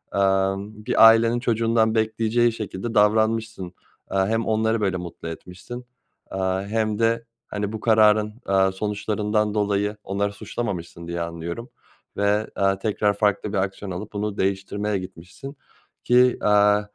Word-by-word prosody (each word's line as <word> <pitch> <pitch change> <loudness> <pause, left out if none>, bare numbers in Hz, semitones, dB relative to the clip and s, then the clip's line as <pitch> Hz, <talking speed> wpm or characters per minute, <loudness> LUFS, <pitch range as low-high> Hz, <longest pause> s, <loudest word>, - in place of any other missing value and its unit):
emm, 100 +2 0
bir - - +6
ailenin 115 +1 +4
çocuğundan 115 -2 +1
bekleyeceği 110 +2 +2
şekilde 110 0 -5
davranmışsın. 110 -2 +1 0.4
Aaa, 95 0 +1
hem 115 +1 0
onları 110 0 +1
böyle 95 -2 0
mutlu 85 -1 -8
etmişsin, 90 +9 -8 0.4
aaa, 95 0 -1
hem 110 +1 -1
de, 115 0 +1 0.2
hani, 105 0 -3
bu 110 - -4
kararın, 105 -1 +4
aaa, 95 -1 +3
sonuçlarından 105 +1 -1
dolayı 105 0 0
onları 100 +1 -1
suçlamamışsın 85 -7 -5
diye 85 0 -3
anlıyorum. 85 +8 -5 0.5
Ve, 105 +1 +1
aaa, 95 0 +1
tekrar 105 0 +1
farklı 105 0 0
bir 105 - 0
aksiyon 95 +1 -3
alıp 100 +4 -6
bunu 105 0 -3
değiştirmeye 100 +2 -1
gitmişsin 95 - -9 0.5
ki, 125 0 +4
aaa, 105 0 +4
105 Hz, 135 wpm, -23 LUFS, 95-110 Hz, 0.5 s, bir